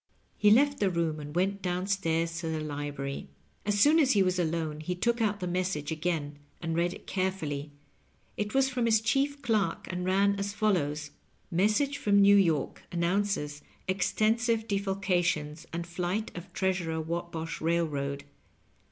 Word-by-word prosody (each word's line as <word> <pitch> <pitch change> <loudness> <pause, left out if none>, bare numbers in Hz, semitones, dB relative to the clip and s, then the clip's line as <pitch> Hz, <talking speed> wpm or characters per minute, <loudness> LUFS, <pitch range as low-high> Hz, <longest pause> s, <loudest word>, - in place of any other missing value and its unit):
He 210 - +4
left 280 +6 +4
the 200 - +3
room 165 -3 -1
and 150 +1 -8
weut 195 +2 +1
down 180 0 -1
stairs 165 -4 0
to 170 - -4
the 160 -1 -1
library. 145 -2 -4 0.4
As 205 0 +2
soon 300 +8 +6
as 275 -4 +4
he 200 -2 +4
was 185 0 +1
alone 160 -2 -1
he 180 +4 -3
took 235 +6 0
out 210 -2 +1
the 180 - -3
message 175 -4 -1
again 155 -3 -2 0.2
and 165 -1 -2
read 175 +1 +1
it - - -14
carefully. 160 -7 -2 0.7
It 210 +2 -3
was 270 0 +4
from 250 -2 -1
his 220 -1 +5
chief 280 +5 0
clerk, 215 -4 0
and 180 0 -3
ran 200 +2 +2
as 200 0 -2
follows: 155 -8 0 0.4
'^ - - -4
Message 215 +10 +2
from 200 -1 +4
ITew 200 0 +7
York 155 -6 -1
announces 170 -4 0 0.3
extensive 220 +4 +1
defalcations 180 -6 0
and 170 +1 -3
flight 180 +5 -3
of 175 +2 -8
treasurer 180 -4 -1
Whatbosh 165 0 -4
Bailroad. 150 -4 -1
180 Hz, 160 wpm, -29 LUFS, 160-205 Hz, 0.7 s, ITew